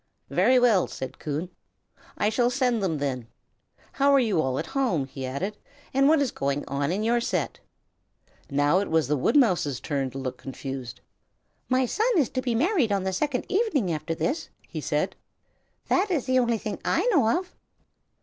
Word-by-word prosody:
"Very 255 - +4
well," 230 -7 +4
said 130 -1 -7
Coon, 155 +4 -4 0.7
"I 210 - +2
shall 240 +2 +2
send 250 -3 +1
them, 175 -5 0
then. 130 -5 -3 0.6
How 280 +1 +3
are 275 - +6
you 215 -10 +2
all 130 -3 -1
at 160 - -2
home?" 210 - 0
he 135 -1 -6
added, 190 +11 -3 0.4
"and 275 +1 +4
what 315 -1 +5
is 260 - -2
going 140 +1 -2
on 140 +2 -1
in 200 +4 -1
your 235 +2 +2
set?" - - -2 0.9
Now 145 +5 +3
it 200 - -2
was 160 -4 +2
the 150 - +1
woodmouse's 175 - +2
turn 140 -3 -2
to 135 - -9
look 130 -2 -4
confused. 130 -2 -7 0.7
"My 255 0 +3
son 440 - 0
is 280 -8 +3
to 255 - -2
be 245 -3 -1
married 295 - +2
on 200 -2 +1
the 190 0 -1
second 255 +5 -1
evening 375 - +1
after 160 +1 -3
this," 285 - -2 0.2
he - - -6
said. - - -1 0.7
"That 390 +3 +2
is 315 -9 0
the 255 0 +3
only 235 -2 +2
thing 215 -1 -5
I - - +1
know 250 - +4
of." 365 0 -6
210 Hz, 185 wpm, -26 LUFS, -, 0.9 s, are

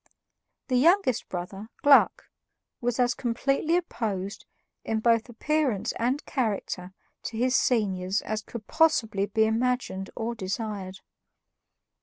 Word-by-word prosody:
The 255 - +2
youngest 330 - +3
brother, 190 +3 -6 0.2
Gluck, 285 -1 +5 0.5
was 245 0 -1
as 245 0 +3
completely 275 +7 0
opposed, 205 - -4 0.4
in 220 - -1
both 230 +1 +2
appearance 265 -3 0
and 255 +5 0
character, 200 -7 -2 0.3
to 225 - -6
his 250 +2 +2
seniors 195 -5 +1
as 215 0 -3
could 215 0 -9
possibly 225 -11 +2
be 220 +2 +2
imagined 225 -4 -1
or 230 +1 -2
desired. 195 -2 -5
230 Hz, 115 wpm, -27 LUFS, 200-255 Hz, 0.5 s, Gluck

